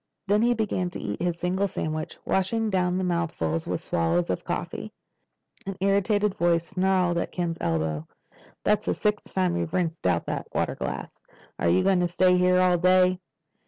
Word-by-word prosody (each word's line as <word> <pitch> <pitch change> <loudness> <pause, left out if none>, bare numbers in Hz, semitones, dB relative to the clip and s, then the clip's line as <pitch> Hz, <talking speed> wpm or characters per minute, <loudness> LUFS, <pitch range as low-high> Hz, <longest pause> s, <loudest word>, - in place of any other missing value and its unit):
Then 205 +1 +3
he 240 +1 +3
began 200 -5 -1
to 175 - -7
eat 105 0 -4
his 175 -1 -1
single 185 +3 0
sandwich, 155 -3 -4
washing 215 +3 0
down 180 -1 +1
the 190 - -1
mouthfuls 165 - -1
with - - -2
swallows 85 +1 +1
of - - -3
coffee. - - -4 0.8
An 195 -1 -4
irritated 200 +1 +2
voice 170 -3 +1
snarled 185 -1 +1
at - - -3
Ken's 170 -2 -2
elbow. 80 -2 -1 0.6
"That's 210 0 +2
the - - 0
sixth 210 -1 -1
time 185 -2 +1
you've 170 -1 -3
rinsed 170 - -1
out 85 -2 +1
that - - -4
water - - 0
glass. - - -6 0.4
You 85 +2 +3
going 190 -2 +3
to 175 - +2
stay 180 +1 +3
here 180 0 +4
all 180 -1 +3
day?" 185 0 +4
180 Hz, 175 wpm, -26 LUFS, 165-190 Hz, 0.8 s, here